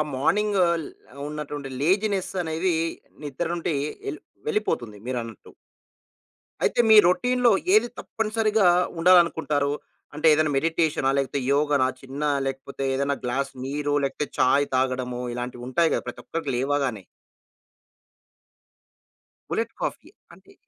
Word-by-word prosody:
Morning 205 +8 +2
ఆహ్, 170 -1 0 0.5
ఉన్నటువంటి 150 -2 -6
laziness 195 +3 +1
అనేవి 165 +2 0 0.5
నిద్ర 145 +4 -3
ఉంటే 165 -2 -2 0.4
ఎళ్ - - -8 0.3
వెళ్ళిపోతుంది 125 - -1
మీరన్నట్టు. 115 -4 -5 1.1
అయితే - - +1
మీ 220 - +9
రౌటీన్‌లో 245 +6 +3 0.2
ఏది 220 +3 +5
తప్పనిసరిగా 215 -2 +1 0.3
ఉండాలనుకుంటారు? 160 -5 +3 0.4
అంటే 155 +2 +2
ఏదైనా 155 0 +2
మెడిటేషనా? 160 -2 +1
లేకపోతే 140 +1 -1
యోగానా? 145 -2 +2
చిన్న 135 +2 -8 0.2
లేకపోతే, 135 +1 -5
ఏదైనా 140 +1 0
గ్లాస్ 135 +3 -1
నీరు 145 +1 -2
లేకపోతే, 140 +2 -3
చాయ్ 140 +3 +4
తాగడమో 130 -1 -1
ఇలాంటివుంటాయి 125 +6 -1
కదా! - - -1
ప్రతి - - -6
ఒక్కరికి 160 -4 -4
లేవగానే? 135 -5 -1 2.5
Bullet - - -2
coffee. - - -4 0.2
అంటే? - - -19
145 Hz, 105 wpm, -25 LUFS, 135-175 Hz, 2.5 s, మీ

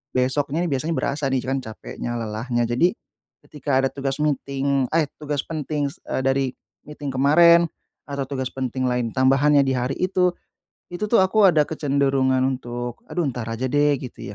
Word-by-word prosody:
besoknya 135 +4 0
nih, - - -2
biasanya 155 +5 -2
berasa 145 +2 -2
nih, 130 - +2
c - - -9
kan 135 +1 0
capeknya, 115 +1 -6
lelahnya. 115 +2 -2
Jadi, 125 +10 +2 0.6
ketika 145 -2 -1
ada 135 - +2
tugas 135 -1 -2
meeting 140 -2 0
eh, 160 -2 +2
tugas 150 -1 -3
penting 150 -2 -2
s - - -15
eee, - - -3
dari 135 0 +2 0.4
meeting 150 -1 -6
kemarin, 170 +5 +6 0.4
atau 140 -1 -3
tugas 130 -2 -3
penting 130 0 -2
lain, 125 -2 -1
tambahannya 140 +2 +4
di 130 - +1
hari 125 +1 -1
itu, 185 -1 +2 0.6
itu 175 +4 -2
tuh 230 - +5
aku 200 +3 +4
ada 155 -3 +4
kecenderungan 135 -3 +1
untuk, 120 -2 -4
"Aduh, 175 - -1
entar 125 -4 -3
aja, 115 +3 -3
deh," 145 +2 +3
gitu 120 -5 -8
135 Hz, 170 wpm, -23 LUFS, 130-150 Hz, 0.6 s, kemarin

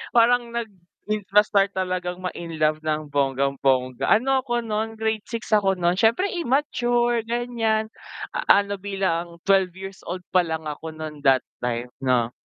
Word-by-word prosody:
Parang 235 0 +4
nag 235 -1 -3 0.4
in 215 -1 0
na 210 - +8
start 200 -1 +2
talagang 180 -1 -2
ma-in 170 -3 -5
love 155 0 +3
ng 155 -1 -1
bonggang-bongga, 135 -2 +1
ano 265 +5 +4
ako 240 -2 -1
no'n 220 0 -2
grade 220 -1 -2
6 230 -2 -6
ako 200 -3 +3
no'n, 180 0 +1
siyempre 235 - +3
immature 240 -7 +1
gan'yan, 230 -2 -1 0.6
ano 200 0 +4
bilang 175 -4 -2
12 190 -2 +3
years 190 0 -9
old 180 +1 -4
palang 160 -4 0
ako 160 +2 -6
no'n 155 -1 -7
that 130 -2 +5 0.2
time, 120 0 -2 0.2
'no. 120 -2 +2
195 Hz, 150 wpm, -24 LUFS, 155-225 Hz, 0.6 s, na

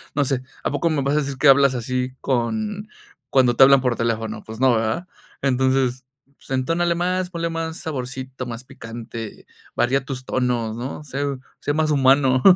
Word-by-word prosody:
no 145 - +3
sé, 130 -1 0 0.2
¿a - - 0
poco 145 +4 +1
me 150 -3 0
vas 140 +2 +1
a - - +3
decir 140 -2 -3
que 150 - +3
hablas 135 -1 +6
así 125 +1 -2
con 210 - -1 0.4
cuando 125 -3 +4
te 135 - +9
hablan 135 -1 +7
por 125 -2 +1
teléfono, 110 -2 -2
pues 110 +1 -8
no, 130 -2 +5
¿verdad?, 115 +11 -1 0.3
entonces, 130 -1 +1 0.3
pues - - -19
entónale 165 +6 +1
más, 180 +1 0
ponle 170 -1 -2
más 165 0 -3
saborcito, 130 -3 -5
más 120 +1 -6
picante, 115 -2 -8 0.3
varía 130 +2 +1
tus 130 -2 -5
tonos, 120 -3 -1
¿no?, 130 +5 -5
ser 140 -1 -3 0.2
sé 145 - -1
más 155 0 +1
humano'". 135 -2 +4
130 Hz, 175 wpm, -22 LUFS, 125-145 Hz, 0.4 s, te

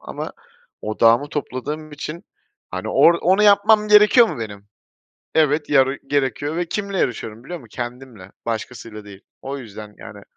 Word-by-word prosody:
ama - - -7 0.5
odağımı 115 +5 +3
topladığım 150 +2 -5
için, 155 +5 -7 0.5
hani, - - -5
"Or 170 - +5
onu 190 +4 +3
yapmam 210 +1 +5
gerekiyor 210 +3 +7
mu - - -6
benim? 100 -3 -7 0.7
Evet, 150 -1 +2
yarı 135 -1 +3
gerekiyor." 145 +2 -1
Ve 175 - 0
kiminle 200 +2 -3
yarışıyorum 115 -3 -3
biliyor 175 +4 -6
musun? 120 - -16
Kendimle, 120 -5 -8
başkasıyla 115 -1 -5
değil. 100 -1 -12 0.2
O 140 +1 -5
yüzden, 105 -4 -10
yani 100 0 -11
135 Hz, 145 wpm, -21 LUFS, 115-170 Hz, 0.7 s, gerekiyor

